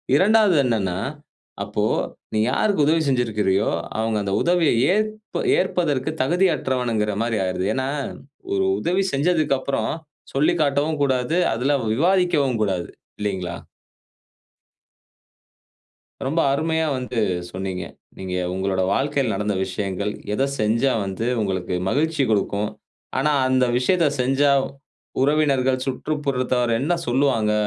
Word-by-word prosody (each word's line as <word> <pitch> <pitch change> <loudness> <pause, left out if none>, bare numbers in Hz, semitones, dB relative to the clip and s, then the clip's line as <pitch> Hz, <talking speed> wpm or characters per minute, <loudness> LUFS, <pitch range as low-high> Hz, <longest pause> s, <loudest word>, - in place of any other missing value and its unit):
2வது 205 +2 +4
என்னன்னா, 100 -7 0 0.7
அப்போ, - - -1 0.5
நீ 110 - +1
யாருக்கு 190 -1 +2
உதவி 160 +1 +3
செஞ்சுருக்கிறியோ, 105 -6 +1 0.3
அவுங்க 110 -1 0
அந்த 100 0 -2
உதவியை 170 -6 +3 0.2
ஏற்ப 215 +1 -2 0.2
ஏற்பதற்கு 155 -6 0
தகுதியற்றவனுகிற 130 - +1
மாரி 115 -2 -1
ஆயிருது. 90 0 -2
ஏன்னா, 130 0 -1 0.7
ஒரு 95 -1 +1
உதவி 180 - +1
செஞ்சதுக்கு 150 -1 +2
அப்பறம் 130 -5 -1 0.4
சொல்லிக்காட்டவும் 150 0 +1
கூடாது. 130 +3 +1 0.2
அதுல 130 +6 +1 0.2
விவாதிக்கவும் 150 - +2
கூடாது, 95 -4 -1 0.3
இல்லைங்களா? 95 -4 -3 2.7
ரொம்ப 160 +5 0
அருமையா 160 +2 0
வந்து 125 -2 -3 0.3
சொன்னீங்க. 95 -1 -4 0.3
நீங்க 95 -1 -5 0.2
உங்களோட 95 0 -1
வாழ்க்கைல 140 -3 0
நடந்த 105 +1 -1
விஷயங்கள். 100 +1 -3 0.2
எதை 135 +6 +1
செஞ்சா 115 +5 +2
வந்து 95 +4 -3 0.2
உங்களுக்கு 95 -3 -2
மகிழ்ச்சி 155 +2 +1
குடுக்கும்? 105 0 0 0.5
ஆனா, 150 +3 +2 0.2
அந்த 130 -1 +3
விஷயத்தை 160 +5 +2
செஞ்சா, 135 +3 +3 0.7
உறவினர்கள், 135 -3 +2
சுற்றுப்புறத்தவர் 130 -4 -1
என்ன 150 +7 +1
சொல்லுவாங்க? 120 -4 +2
130 Hz, 105 wpm, -22 LUFS, 105-155 Hz, 2.7 s, 2வது